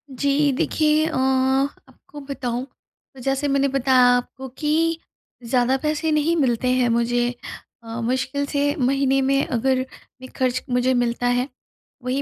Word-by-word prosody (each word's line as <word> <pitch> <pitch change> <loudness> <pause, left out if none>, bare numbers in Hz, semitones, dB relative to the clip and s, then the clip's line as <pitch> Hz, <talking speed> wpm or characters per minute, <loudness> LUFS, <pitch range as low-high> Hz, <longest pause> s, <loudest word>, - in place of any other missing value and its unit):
जी। 285 +2 +2
देखिए, 310 0 +2
अ, 320 - -4
आपको 265 +2 -1
बताऊँ 250 -3 -3 0.5
तो - - -13
जैसे 270 +2 -1
मैंने 275 0 +2
बताया 265 -1 +3 0.2
आपको 260 +2 -6
कि 325 +2 +1 0.5
ज़्यादा 250 +2 +2
पैसे 310 +1 0
नहीं 305 +3 +2
मिलते 255 -5 +1
हैं 250 -1 +2
मुझे। 240 +1 +1 0.5
अ, 225 +1 -6
मुश्किल 260 +4 -1
से 285 +1 0
महीने 270 +1 +2
में 275 +1 +2
अगर 260 +1 0 0.4
एक 255 - -10
खर्च 255 -1 0
मुझे 250 +1 +2
मिलता 245 0 0
है 245 +2 +1 0.6
वही 260 +2 -1
265 Hz, 145 wpm, -22 LUFS, 250-285 Hz, 0.6 s, बताया